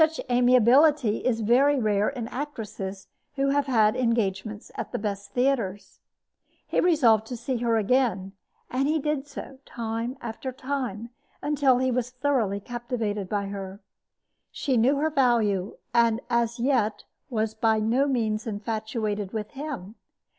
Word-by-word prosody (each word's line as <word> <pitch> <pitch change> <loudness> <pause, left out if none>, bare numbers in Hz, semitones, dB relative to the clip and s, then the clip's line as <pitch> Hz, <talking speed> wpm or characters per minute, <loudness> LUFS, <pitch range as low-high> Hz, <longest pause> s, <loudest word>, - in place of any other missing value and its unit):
Such 315 0 +3
amiability 250 +1 +5
is 230 -3 0
very 265 +6 +4
rare 210 -2 +2
in 245 -5 -5
actresses 215 -8 -6 0.3
who 275 0 +1
have 280 0 +1
had 220 -5 +3
engagements 215 -3 -1
at 225 - -5
the - - -2
best 200 -1 -4
theaters. 240 -7 -1 0.7
He - - 0
resolved 240 - +4
to 245 - -5
see 245 +2 -2
her 230 -1 +1
again; 215 -4 +1 0.4
and 265 +2 +1
he 310 +2 +2
did 300 -1 -2
so, 275 -1 -9
time 230 +2 -4
after 240 +3 -5
time, 250 -4 -4 0.3
until 285 -4 +3
he 260 0 +1
was 245 0 -1
thoroughly 250 -6 0
captivated 225 -3 -3
by 200 -1 -1
her. 195 -1 -6 0.7
She 265 - -1
knew 245 +5 +4
her 310 +3 0
value, 225 -8 +1 0.2
and 230 -1 +3
as 235 0 +1
yet 235 -4 +1 0.3
was 220 -3 -1
by 220 0 +2
no 235 +6 +2
means 230 -3 -1
infatuated 215 -1 -3
with 215 -2 -4
him. 275 -9 -6
235 Hz, 145 wpm, -26 LUFS, 215-265 Hz, 0.7 s, amiability